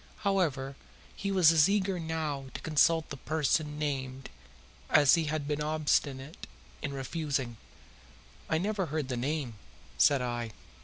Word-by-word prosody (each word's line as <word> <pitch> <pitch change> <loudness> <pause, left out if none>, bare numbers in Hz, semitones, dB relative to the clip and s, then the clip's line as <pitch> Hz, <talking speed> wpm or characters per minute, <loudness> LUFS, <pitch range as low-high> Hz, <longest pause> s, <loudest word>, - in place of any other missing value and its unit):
However, 145 -9 0 0.4
he 200 - -3
was 180 -5 +6
as 160 +1 +5
eager 195 -2 +1
now 160 -4 -3
to - - -5
consult 160 +1 +2
the 140 - -5
person 150 +1 0
named 135 -3 -3 0.6
as 145 -2 +6
he 165 -2 +3
had 150 -1 -2
been 150 0 -1
obstinate 150 -2 -1 0.3
in 145 - -3
refusing. 140 -3 -3 0.9
"I 160 - +2
never 195 +1 -1
heard 150 -2 -3
the 125 - -1
name," 130 -4 -3 0.4
said 140 -3 +5
I. 120 -2 -3
150 Hz, 140 wpm, -30 LUFS, 135-160 Hz, 0.9 s, was